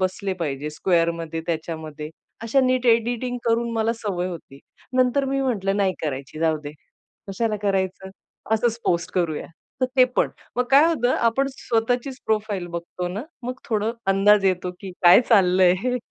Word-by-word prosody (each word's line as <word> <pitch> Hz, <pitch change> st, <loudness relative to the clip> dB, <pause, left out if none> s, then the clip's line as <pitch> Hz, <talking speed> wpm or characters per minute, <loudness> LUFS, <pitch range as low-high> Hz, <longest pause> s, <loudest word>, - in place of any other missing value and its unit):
बसले 190 Hz, +1 st, -1 dB
पाहिजे, 145 Hz, 0 st, -3 dB
स्क्वेअरमध्ये, 165 Hz, -1 st, 0 dB
त्याच्यामध्ये 160 Hz, -2 st, -5 dB, 0.3 s
अशा 235 Hz, +4 st, +2 dB
नीट 255 Hz, -1 st, +1 dB
एडिटिंग 240 Hz, +2 st, +1 dB
करून, 235 Hz, 0 st, +1 dB
मला 225 Hz, 0 st, +1 dB
सवय 195 Hz, -5 st, -3 dB
होती. 160 Hz, -5 st, -9 dB, 0.4 s
नंतर 255 Hz, +2 st, +3 dB
मी 275 Hz, 0 st, -1 dB
म्हटलं, 200 Hz, -7 st, 0 dB
"नाही 195 Hz, -2 st, +2 dB
करायची, 140 Hz, 0 st, -4 dB
जाऊदे 155 Hz, -2 st, 0 dB, 0.6 s
कशाला 215 Hz, +2 st, -1 dB
करायचं, 190 Hz, -1 st, -1 dB, 0.4 s
असंच 230 Hz, +1 st, 0 dB
पोस्ट 170 Hz, -1 st, 0 dB
करूया." 170 Hz, -4 st, -1 dB, 0.3 s
तर 255 Hz, -, +3 dB
ते 255 Hz, -, +8 dB
पण -, -, +3 dB, 0.3 s
मग 250 Hz, -, +2 dB
काय 280 Hz, +3 st, +7 dB
होतं, 255 Hz, -7 st, +1 dB
आपण 235 Hz, +4 st, +1 dB
स्वतःचीच 245 Hz, +1 st, -1 dB
प्रोफाइल 210 Hz, -4 st, -1 dB
बघतो 175 Hz, +1 st, -5 dB
ना, 200 Hz, +5 st, -4 dB, 0.2 s
मग 250 Hz, +1 st, -3 dB
थोडं 220 Hz, 0 st, -1 dB
अंदाज 195 Hz, +1 st, +4 dB
येतो, 185 Hz, -1 st, +1 dB
की 195 Hz, -2 st, -7 dB
काय 175 Hz, +6 st, +8 dB
चाललंय 185 Hz, -4 st, +5 dB
हे. 250 Hz, 0 st, 0 dB
200 Hz, 155 wpm, -23 LUFS, 175-235 Hz, 0.6 s, ते